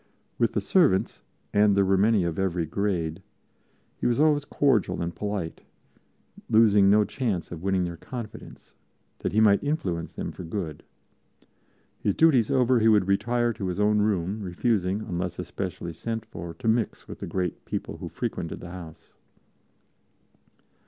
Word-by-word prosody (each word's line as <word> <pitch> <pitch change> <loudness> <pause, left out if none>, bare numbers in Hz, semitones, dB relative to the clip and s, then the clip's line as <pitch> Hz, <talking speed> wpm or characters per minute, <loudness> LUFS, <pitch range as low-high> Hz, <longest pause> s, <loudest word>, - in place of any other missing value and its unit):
With - - +2
the - - 0
servants, 150 - +2 0.3
and 105 -1 +4
there 100 - +4
were 95 +1 +3
many 105 0 +3
of 85 +1 -2
every 90 -3 0
grade, 90 -2 -2 0.8
he - - 0
was 120 +2 +1
always 150 -1 +3
cordial 135 -9 +1
and 85 0 -2
polite, 100 -4 -4 0.9
losing 105 -3 +5
no 105 +1 +5
chance 110 -10 -2
of 85 -2 -7
winning 95 -1 +1
their 85 -1 -4
confidence, 115 +3 -9 0.5
that - - -2
he 110 - +2
might 105 -2 +5
influence 95 - -2
them - - -4
for - - -9
good. 80 -4 -5 1.2
His 100 - 0
duties 135 -9 +4
over, 125 -1 +3
he 110 - +3
would 105 -4 +4
retire 120 +4 +1
to 100 -4 -4
his 90 +2 -3
own 105 0 +3
room, 105 0 0
refusing, 95 +1 0
unless 90 -3 -3
especially 90 -2 -5
sent 115 +6 -4
for, 85 -1 -8
to 100 - -6
mix 110 0 0
with - - -9
the - - -5
great 90 -2 -3
people - - -4
who - - -7
frequented 85 - -4
the 85 - -9
house. 85 -3 -11
100 Hz, 160 wpm, -26 LUFS, 90-110 Hz, 1.2 s, losing